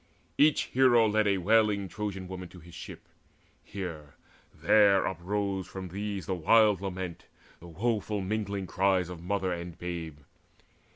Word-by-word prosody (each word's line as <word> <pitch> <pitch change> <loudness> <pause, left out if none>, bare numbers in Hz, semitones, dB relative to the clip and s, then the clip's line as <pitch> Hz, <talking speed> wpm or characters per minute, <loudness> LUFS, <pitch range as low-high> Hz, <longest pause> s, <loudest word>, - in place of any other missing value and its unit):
Each 150 +1 +4
hero 120 -3 +4
led 110 0 +2
A 100 -1 +2
wailing 105 +1 +2
Trojan 95 -2 -5
woman 90 -1 -7
to 90 - -13
his 85 +1 -15
ship. 85 - -10 0.6
Here, 80 -8 -7 0.4
there, 100 -3 +4
uprose 95 +1 -2
from 95 0 -7
these 100 +1 -4
the 95 - -2
wild 105 +3 +4
lament, 95 -3 -5 0.3
The 85 - -12
woeful 105 +3 -1
mingling 100 0 -2
cries 95 0 +1
of 90 -2 -8
mother 95 0 -1
and 85 0 -7
babe. 85 -4 -5
95 Hz, 140 wpm, -29 LUFS, 90-105 Hz, 0.6 s, Each